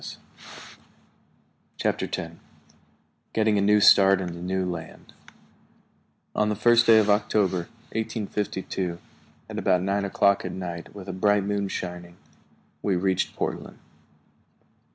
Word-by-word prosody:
] - - -37
CHAPTER - - -1
TEN - - -6 0.9
GETTING 110 -2 +2
A - - +1
NEW 105 +1 +4
START 100 -1 +6
IN 90 -2 -4
THE 85 - -9
NEW 95 +1 -1
LAND 85 -3 -7 1.2
ON 105 0 +1
the 105 - 0
first 120 +3 +4
day 115 -1 +8
of 110 -1 +4
October, 100 -4 +1 0.3
1852, 100 -5 -3 0.5
at - - -5
about 90 0 +2
nine 100 +1 0
o'clock 100 0 +2
at - - -5
night, 85 -1 -7
with 100 -2 -9
a 95 - -4
bright 105 +2 +2
moon 100 0 -1
shining, 90 -2 -6 0.6
we 100 -2 0
reached 95 +1 0
Portland. - - -4
100 Hz, 130 wpm, -25 LUFS, 90-105 Hz, 1.2 s, day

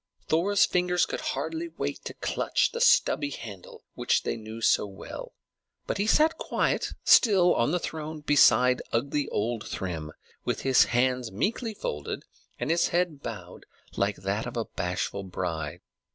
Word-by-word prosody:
Thor's 190 +5 +3
fingers 180 0 +1
could - - -5
hardly 330 +1 -3
wait 330 - -5
to - - -6
clutch - - 0
the 470 - -4
stubby 150 - +4
handle 105 -9 -9
which - - +1
they - - -1
knew 110 0 -8
so 110 - +3
well; 95 -1 -9 0.5
but - - -3
he 205 - +1
sat 310 +7 +3
quite - - 0
still 190 -6 +6
on 120 - +1
the 175 - +1
throne 155 -2 -5
beside 125 -4 +5
ugly 140 +4 0
old 115 +1 -2
Thrym, 80 -5 -4 0.3
with - - -2
his 135 -1 +5
hands 125 -1 0
meekly 220 - -2
folded 75 - -4 0.4
and - - -1
his 170 +1 +3
head 170 -5 -1
bowed 95 -8 -8 0.3
like 100 +1 0
a 110 +5 -3
bashful 100 +2 -2
bride. 85 -5 -4
125 Hz, 150 wpm, -27 LUFS, -, 0.5 s, still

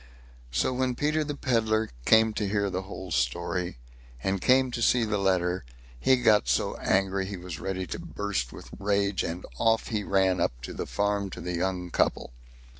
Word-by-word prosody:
So 65 - +1
when 125 0 0
Peter 155 +3 +1
the 145 -1 -4
Pedlar 110 -5 +1
came 110 0 +5
to 105 -1 -1
hear 100 -1 0
the 95 0 -2
whole 95 +1 -8
story, 85 -2 -1 0.5
and 95 -1 0
came 130 0 +4
to 120 - -3
see 120 +1 +4
the 105 -1 -1
letter, 95 -2 +1 0.4
he 130 - +5
got 110 - +4
so 65 - +1
angry 95 0 +1
he 100 -1 -5
was 90 -3 -7
ready 95 -1 -3
to - - -5
burst 100 -12 -3
with - - -11
rage, 100 0 +1
and 85 +2 -4
off 115 0 +2
he 105 -2 -1
ran 95 -2 +2
up - - 0
to - - -6
the - - -4
farm 100 -1 0
to - - -8
the 90 - -4
young 90 0 -2
couple. - - 0
100 Hz, 190 wpm, -28 LUFS, 90-110 Hz, 0.5 s, came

